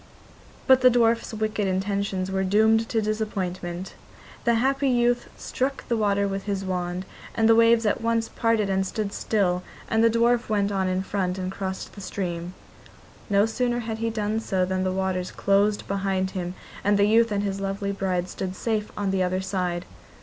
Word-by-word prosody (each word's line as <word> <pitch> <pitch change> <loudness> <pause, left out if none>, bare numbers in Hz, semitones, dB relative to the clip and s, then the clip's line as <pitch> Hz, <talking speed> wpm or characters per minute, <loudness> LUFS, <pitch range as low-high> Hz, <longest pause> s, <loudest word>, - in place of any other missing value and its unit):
But 260 -1 +6
the 255 - +8
dwarf's 230 -1 +2
wicked 215 -2 -1
intentions 190 0 -1
were 190 0 0
doomed 220 +3 +3
to 225 -2 +1
disappointment. 190 -4 -3 0.5
The 235 -1 +4
happy 270 +3 +2
youth 245 -1 +2
struck 270 +1 -3
the 235 - +1
water 200 -2 +1
with 195 0 -4
his 195 -2 -2
wand, 180 0 -3 0.3
and 225 -1 +3
the 225 - +7
waves 230 0 +5
at 210 - +1
once 230 0 +1
parted 230 -3 +1
and 190 0 +1
stood 200 +1 -3
still, 180 -5 0 0.3
and 225 0 +2
the 230 - +6
dwarf 235 +1 +2
went 205 -1 +1
on 190 -1 0
in 185 0 0
front 190 -2 -2
and 185 0 -3
crossed 190 -1 -5
the 200 - -10
stream. 180 -2 -4 0.7
No 200 0 +4
sooner 240 +2 -1
had 225 -1 -4
he 230 0 0
done 215 -1 -1
so 190 -4 0
than 185 0 -1
the 185 - 0
waters 185 -1 -1
closed 200 +1 +1
behind 195 -1 -1
him, 180 -1 -4 0.3
and 205 +1 +3
the 200 - +4
youth 225 +1 +4
and 205 0 0
his 195 -1 -2
lovely 195 0 -2
bride 185 -2 -1
stood 185 0 -5
safe 215 0 -2
on 200 -2 0
the 190 -1 +1
other 185 0 +1
side. 180 -2 -2
200 Hz, 185 wpm, -25 LUFS, 190-225 Hz, 0.7 s, the